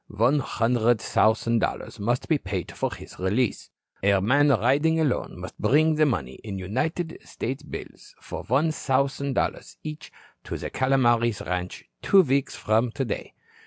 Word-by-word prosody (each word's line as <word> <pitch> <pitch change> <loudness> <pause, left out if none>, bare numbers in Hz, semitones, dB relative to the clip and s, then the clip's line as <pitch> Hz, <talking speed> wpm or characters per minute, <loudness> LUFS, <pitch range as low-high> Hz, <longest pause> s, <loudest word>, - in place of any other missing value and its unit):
One 120 +8 +2
hundred 120 -2 +1
thousand 115 +3 +2
dollars - - -3
must 120 +5 -1
be 155 -3 +2
paid 95 - -4
for - - -2
his - - -11
release. 105 +6 0 0.3
A 100 0 +3
man 140 +9 +3
riding 140 +6 +3
alone 140 - -1
must 90 +1 -9
bring 150 +9 +4
the 155 0 +3
money 65 - -2
in 100 -3 -5
United 150 - -2
States 130 +3 -5
bills - - -10 0.2
of - - -6
one 145 +6 +3
thousand 140 -1 0
dollars - - -2
each 155 0 -7 0.3
to - - -4
the - - -6
Calomares 120 -4 +2
ranch 90 0 -3 0.2
two 195 - +6
weeks 140 -2 0
from 110 +3 +1
today. 130 -3 -4
125 Hz, 155 wpm, -25 LUFS, 105-140 Hz, 0.3 s, two